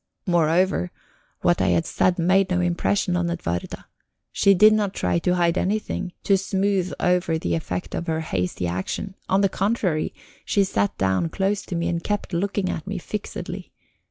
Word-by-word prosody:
Moreover, 170 - +2 0.5
what 85 - +2
I 95 - +2
had 85 -1 +2
said 180 -1 +1
made 185 +3 +3
no 180 -1 +1
impression 180 +2 +1
on 175 -1 0
Edwarda. 90 - -4 0.5
She 200 0 +4
did 215 +3 +7
not 205 -3 0
try 90 -1 +1
to 180 - +1
hide 170 0 +2
anything, 195 -2 -2
to 195 -1 +3
smooth 195 -1 0
over 180 -2 +2
the 85 - -2
effect 90 +2 -3
of 170 - -3
her 160 0 0
hasty 90 - -2
action: 95 - -3 0.2
on 190 +1 +3
the 200 - +4
contrary, 195 -5 -1 0.3
she 200 - +2
sat 100 - 0
down 95 - +1
close 195 +3 0
to 180 - -4
me 170 0 -1
and 170 -1 -2
kept 205 -2 -2
looking 195 +2 0
at 165 0 -4
me 200 0 -3
fixedly. 205 +3 -6
180 Hz, 175 wpm, -23 LUFS, 160-195 Hz, 0.5 s, did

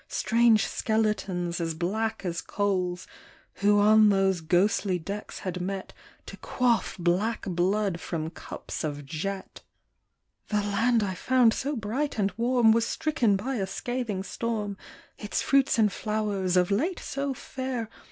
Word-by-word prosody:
Strange 230 -2 +3
skeletons, 195 -6 -1
as 165 -1 -2
black 220 +6 -2
as 170 -2 -2
coals, 185 -3 -1 0.5
Who 205 +1 +4
on 215 +1 +6
those 195 -3 +2
ghostly 185 +3 +2
decks 200 +5 -6
had 180 -1 -4
met 190 +1 -4 0.3
To - - -9
quaff 245 -2 0
black 185 +6 0
blood 185 +1 0
from 160 -2 -4
cups - - -7
of 145 -2 -4
jet. 190 +7 -5 0.9
The 210 -1 0
land 225 +3 +2
I 190 -2 -2
found 245 +3 +3
so 285 +2 -2
bright 240 +7 -2
and 200 -2 +1
warm 235 0 +4
Was 230 +1 +2
stricken 245 -10 +1
by 250 +7 -2
a 195 -2 -1
scathing 230 -2 -3
storm; 210 -1 -3 0.4
Its 210 - -2
fruits 275 -3 +3
and 215 -3 +4
flowers, 205 -4 -1
of 180 +2 +3
late 320 - +1
so 275 -1 -3
fair. 255 -3 -4
205 Hz, 140 wpm, -27 LUFS, 185-230 Hz, 0.9 s, on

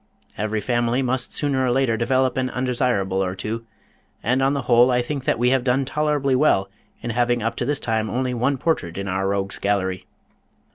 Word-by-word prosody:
Every 110 +1 -2
family 120 +2 0
must 125 -1 -1
sooner 140 -3 0
or 130 - +1
later 125 -2 +2
develop 130 +2 +1
an 130 -1 0
undesirable 120 -7 0
or 90 0 -3
two, 115 +4 -5 0.6
and 125 +4 +1
on 135 +2 +2
the 140 - -2
whole 120 0 +5
I 125 -1 +2
think 135 +1 -4
that - - +1
we 125 +2 +2
have 130 -2 +2
done 130 +1 +1
tolerably 145 -1 0
well 115 -8 +2 0.3
in 120 - -2
having 120 0 +1
up 115 +1 -1
to - - -1
this 145 -1 0
time 110 -1 -1
only 125 0 -1
one 125 +3 0
portrait 120 - -1
in 100 0 -4
our 95 0 -1
Rogues' 100 0 -2
Gallery. 95 -2 -1
120 Hz, 200 wpm, -22 LUFS, 110-130 Hz, 0.6 s, whole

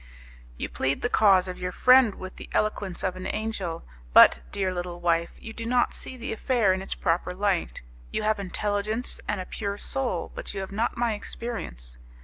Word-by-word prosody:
"You - - -3
plead 135 +1 -1
the 245 - 0
cause 195 -3 +5
of 180 - -6
your 180 0 -3
friend 250 +1 +6
with 185 0 -9
the - - -9
eloquence 200 -4 -1
of 185 - 0
an 185 0 -5
angel, 195 -7 -3 0.3
but, - - +9
dear 190 -2 0
little 175 -1 -4
wife, 170 -1 +1
you 225 - -8
do 230 - -6
not 245 +1 +2
see 260 - -5
the 235 -1 -4
affair 225 -4 +2
in 185 - -2
its 190 - -4
proper 175 0 0
light. 195 - -1 0.3
You - - -1
have 215 0 +1
intelligence 205 +4 -2
and 205 - -1
a 185 - -4
pure 200 0 -4
soul, 270 +3 -2
but - - -6
you - - -2
have 190 - -6
not 220 +4 -1
my 235 -1 +1
experience. 60 - -6
200 Hz, 195 wpm, -26 LUFS, 180-225 Hz, 0.3 s, but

